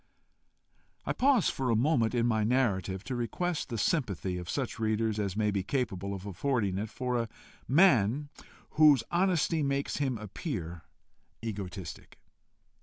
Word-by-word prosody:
I - - 0
pause 265 -6 +3
for 130 -2 -2
a 115 - +3
moment 120 -1 +2
in 120 -1 +2
my 110 -2 +2
narrative 105 -6 0
to 130 - -4
request 155 +9 -2
the 115 - -3
sympathy 100 - -1
of 90 0 -8
such 130 -5 -3
readers 110 -1 0
as 100 -1 -2
may 105 -1 +2
be 100 -1 0
capable 100 -4 -2
of 95 0 -8
affording 100 -1 -1
it, 105 +1 -3
for 125 +1 -2
a 115 - -5 0.4
man 145 - +4 0.4
whose 150 -6 +6
honesty 175 -3 +2
makes 140 -1 -1
him 135 -4 0
appear 100 - -5 0.6
egotistic. 95 -7 -6
115 Hz, 145 wpm, -30 LUFS, 100-140 Hz, 0.6 s, whose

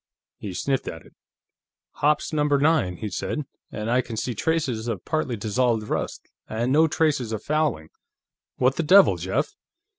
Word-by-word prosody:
He 95 -4 -6
sniffed 135 +5 -1
at 80 - -7
it. - - -19 0.8
"Hoppe's 150 +2 +1
Number 150 -1 +2
Nine," 140 - +2
he 105 - -4
said. 150 +10 -3 0.3
"And 110 +2 -3
I 125 +1 +4
can 115 -2 -7
see 125 +3 -2
traces 125 -3 -1
of 115 - -4
partly 155 -6 -1
dissolved 110 +1 0
rust, - - -3 0.2
and 120 +3 -1
no 155 +3 +5
traces 150 -7 0
of 110 - -4
fouling. 150 - 0 0.7
What 130 +1 +2
the - - +2
devil, 190 +5 +6
Jeff?" - - -1
130 Hz, 160 wpm, -24 LUFS, 110-150 Hz, 0.8 s, devil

